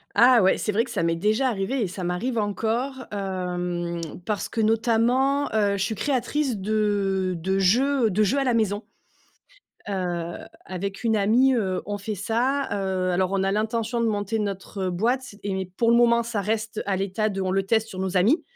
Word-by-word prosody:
Ah 245 -1 +7
ouais, 190 - +4
c'est 210 - -2
vrai 225 +3 +3
que 240 - -9
ça 205 -7 -1
m'est 165 0 +1
déjà 215 +9 +1
arrivé 235 +3 -1
et - - -1
ça 185 +1 -6
m'arrive 180 +8 -2
encore, 230 +5 -1
hem, 180 -3 -3 0.2
parce 210 -2 -2
que - - -4
notamment, 235 +5 +2
heu, 205 -2 +2
je 190 - 0
suis 220 +2 -2
créatrice 270 +1 -1
de 200 -2 0
de 190 +4 -1
jeux, 250 +7 +3
heu, - - -1
de 205 +4 +1
jeux 225 +7 +1
à 275 - +2
la 250 -2 +1
maison. 215 -2 0 1.1
Heu, 175 -3 -3 0.3
avec 195 +3 -5
une 225 -1 +2
amie, 235 +6 +4
heu, 190 -6 -1
on 205 0 -3
fait 210 +2 -4
ça 245 +8 0
heu 190 -2 -1
alors 185 +1 +1
on 195 -1 +1
a 195 - +1
l'intention 225 +3 -1
de 230 - +2
monter 210 0 -1
notre 195 -1 -3
boîte 235 +7 -1
et 190 -2 -2
pour 230 -1 +3
le 235 - +5
moment, 235 -1 +4
ça 230 -3 -3
reste 220 +2 -2
à 195 -1 0
l'état 195 +3 -1
de 195 -2 -4
on 185 - -1
le 195 +1 +1
teste 220 +2 +1
sur 190 - -9
nos 190 0 -2
amis. 220 - +3
210 Hz, 200 wpm, -24 LUFS, 190-235 Hz, 1.1 s, Ah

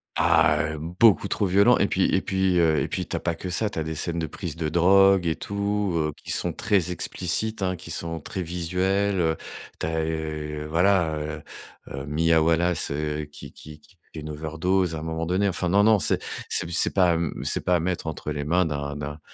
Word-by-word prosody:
Ah, 80 -1 +3 0.2
heu, - - -7
beaucoup 90 +6 +3
trop 100 0 0
violent 100 +6 +4
et 100 - +3
puis 95 - 0
et 95 - +2
puis, 95 -2 +1
heu 80 -2 +3
et - - -1
puis, - - -4
tu - - -4
as - - -1
pas 85 - -2
que 85 +3 -7
ça, 105 +4 0
tu - - -4
as - - -1
des 80 0 -5
scènes 85 +2 -2
de 80 - -2
prises 85 +1 -6
de 80 -2 -2
drogue 95 +2 +4
et 80 -1 0
tout, 100 -1 -2
heu, 75 -1 0
qui - - -13
sont 90 - 0
très 100 -2 0
explicites 95 +4 -2
hein, 90 -1 0
qui 90 0 -11
sont 85 0 -3
très 95 +5 -5
visuelles, 90 +3 -1
heu. 80 -1 +1 0.4
Tu - - -2
as, 80 0 -1
heu, 75 -1 -4
voilà, 85 -1 +2
heu, 75 0 -5 0.6
Mia 80 +2 +2
Wallace, 85 0 +1
heu, 75 +1 -3
qui 75 - -12
qui 75 0 -13
qui 90 +5 -24 0.2
fait 80 - -7
une 75 - -7
overdose 80 +4 -1
à 80 - -4
un - - -7
moment 80 0 -3
donné. 95 +4 +1
Enfin 90 0 -1
non, 100 +3 +4
non, 110 0 +5
c'est - - +3 0.3
c'est - - +1
c'est 85 - +3
pas, 90 -3 +3
mmh 85 -3 -3
c'est - - +1
pas 90 - +2
à - - -2
mettre 90 +1 -2
entre 80 -1 -5
les 75 -1 -3
mains 90 +4 +2
d'un 70 -1 -4
d'un 75 +1 -6
85 Hz, 225 wpm, -24 LUFS, 80-95 Hz, 0.6 s, non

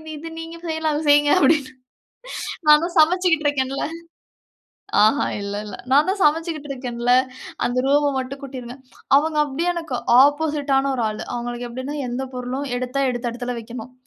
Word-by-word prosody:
இது 325 +2 -8
நீங்க 330 +1 -8
செய்யலாம். 320 -1 -1
அத 310 - -2
செய்யுங்க." 290 0 +5
அப்டினு. 290 -7 +3 1.0
"நானும் 330 +4 +5
சமைச்சுகிட்டு 330 -1 +3
இருக்கேன்ல. 275 -1 -1 1.2
ஆஹா 220 +7 +3 0.2
இல்ல 200 0 -4
இல்ல. 205 - -7 0.2
நான் 290 +5 +5
தான் 390 0 -1
சமைச்சுகிட்டு 310 -1 0
இருக்கேன்ல. 245 -2 -1 0.5
அந்த 245 +1 -1
ரூம்ம 285 +1 +3
மட்டும் 270 +2 -6
கூட்டிருங்க." 255 -1 -8 0.4
அவங்க 310 +1 0
அப்டியே 325 +6 -1
எனக்கு 325 -7 -4 0.2
ஆப்போசிட்டான 290 -2 +2
ஒரு 240 - -1
ஆள. 215 - -6 0.2
அவங்களுக்கு 240 0 -4
எப்டினா 260 +4 -5
எந்த 255 +2 -3
பொருளும் 255 +2 -4
எடுத்தா 255 +2 -2
எடுத்த 240 -1 -3
இடத்துல 245 0 -4
வைக்கணும். 235 +2 -9
275 Hz, 145 wpm, -22 LUFS, 250-310 Hz, 1.2 s, செய்யுங்க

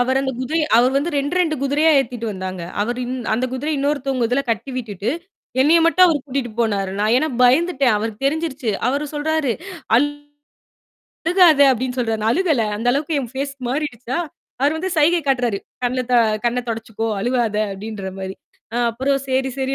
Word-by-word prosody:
அவரு 260 +2 +2
அந்தக் 265 -3 -3
குதிரைய 310 +5 0
அவரு 245 +2 +5
வந்து 295 +5 0
2 285 +5 -1
2 330 -4 +2
குதிரையா 295 +4 +3
ஏத்திட்டு 245 -3 -2
வந்தாங்க. 185 -2 -5 0.2
அவரு 240 +4 -1
இந் 250 +1 -4 0.2
அந்தக் 255 +2 -2
குதிரைய 295 +4 -2
இன்னொருத்தவங்க 275 -3 0
இதுல 265 +3 +1
கட்டி 230 +5 -2
விட்டுட்டு, 220 -3 -3 0.5
என்னைய 320 +5 +5
மட்டும் 365 +2 +5
அவரு 315 -4 +2
கூட்டிட்டு 265 -3 -3
போனாரு. 200 -4 0
நான் 215 +3 +3
ஏன்னா 310 +2 0 0.2
பயந்துட்டேன். 270 -2 +3
அவருக்குத் 220 +4 -4
தெரிஞ்சிருச்சு. 285 -5 -1 0.2
அவரு 285 +3 -1
சொல்றாரு. 300 -3 0 1.5
"அழுகாத!" 335 -3 +3
அப்பிடீன்னு 255 +1 -2
சொல்றாரு. 225 -2 -1
நான் 220 +1 +2
அழுகல, 310 - +1
அந்த 235 +3 -1
அளவுக்கு 295 +2 0
என் 240 -3 -6
ஃபேஸ் 275 +1 -3
மாறிடுச்சா! 260 -1 -3 0.4
அவரு 290 +3 +2
வந்து 375 +3 -3
சைகை 330 +3 +4
காட்டுறாரு, 245 -6 +1 0.2
"கண்ணுல, 255 +1 0
த - - +5 0.3
கண்ணத் 245 0 -1
தொடச்சுக்கோ! 225 0 -4
அழுவாத!" 235 -2 0 0.2
அப்பிடீன்ற 195 -1 -6
மாரி. 190 0 -5 0.4
நான் 240 0 +2
அப்புறம் 270 +4 0
சரி, 265 +1 +1
சரி 265 +1 -1
260 Hz, 165 wpm, -20 LUFS, 230-290 Hz, 1.5 s, அவரு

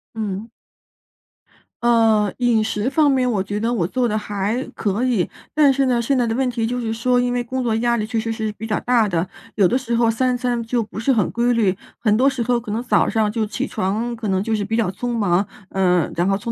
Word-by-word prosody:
嗯。 215 0 -4 1.3
呃， 225 -4 +3
饮 240 -3 +2
食 215 +1 -2
方 295 +1 +4
面 260 -2 +2
我 205 -4 0
觉 205 +2 -3
得 230 +3 0
我 180 -8 0
做 250 +5 0
得 215 - -1
还 210 +3 -2
可 210 +2 -1
以。 235 -9 +1 0.3
但 295 -3 +5
是 270 0 +1
呢， 245 -2 +2
现 235 +4 +1
在 245 -2 +1
的 225 - -1
问 265 +1 +1
题 235 -2 -1
就 245 +1 -2
是 225 -2 -2
说， 245 +2 +1
因 245 0 0
为 245 0 0
工 255 +2 -3
作 235 -2 0
压 235 +1 +1
力 215 - -1
确 225 +1 -2
实 225 +1 -2
是 220 -1 -2
比 215 +2 -7
较 215 - 0
大 235 -4 +2
的， 175 0 -1 0.3
有 200 -4 +4
的 240 - 0
时 240 -2 -2
候 230 -1 +3
三 250 +2 0
餐 245 -1 -1
就 230 +1 -1
不 215 - -8
是 250 +5 +1
很 220 -7 +1
规 240 +1 +1
律。 210 -5 +2 0.2
很 215 -3 +2
多 260 +5 +4
时 265 -3 -2
候 240 +1 +1
可 220 -3 -7
能 225 +3 -2
早 250 - +2
上 220 -2 +1
就 220 0 -1
起 205 -1 -3
床 220 +6 -2
可 225 -1 -5
能 190 -1 +1
就 225 +1 0
是 210 - -1
比 220 +3 -2
较 220 -6 +1
匆 240 +5 -3
忙， 195 -2 +1 0.2
呃， 180 -3 +2
然 175 +2 +1
后 195 - +2
匆 230 +3 -4
225 Hz, 270 characters per minute, -21 LUFS, 210-245 Hz, 1.3 s, 但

